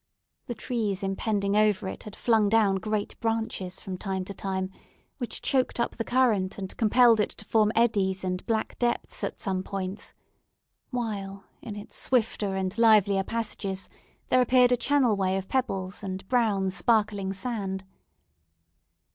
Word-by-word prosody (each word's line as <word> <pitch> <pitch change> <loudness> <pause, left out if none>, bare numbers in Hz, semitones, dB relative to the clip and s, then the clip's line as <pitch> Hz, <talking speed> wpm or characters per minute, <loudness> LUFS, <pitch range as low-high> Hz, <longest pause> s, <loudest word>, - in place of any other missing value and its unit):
The 240 - -4
trees 215 -4 -2
impending 200 +1 0
over 210 -2 +3
it - - -6
had 210 - -8
flung 220 -3 +3
down 205 -3 +3
great 215 +1 -3
branches 225 -5 -2
from 185 -1 -6
time 190 -2 -3
to 200 - -7
time, 190 -1 -3 0.5
which 245 - -4
choked 260 -2 +1
up 235 - +1
the 230 - -2
current, 230 -7 +2
and 190 -2 -6
compelled 230 0 +5
it 210 - +2
to 215 - -11
form 215 0 +3
eddies 200 -5 +2
and 180 0 -2
black 220 -2 -1
depths 240 -1 -1
at - - -3
some 190 -3 -1
points; 190 +1 -5 0.7
while, 200 -6 -4 0.2
in 215 -3 -7
its 205 0 -9
swifter 220 -5 0
and 190 +3 -2
livelier 205 -4 +5
passages 200 -3 -4 0.4
there 255 - +5
appeared 250 0 +5
a - - +6
channel 250 -2 +2
way 190 -1 +1
of 195 0 -5
pebbles, 195 -8 -2
and 190 -1 -5
brown, 205 -6 +2
sparkling 205 -2 +1
sand. 195 -2 -3
205 Hz, 155 wpm, -27 LUFS, 190-230 Hz, 0.7 s, a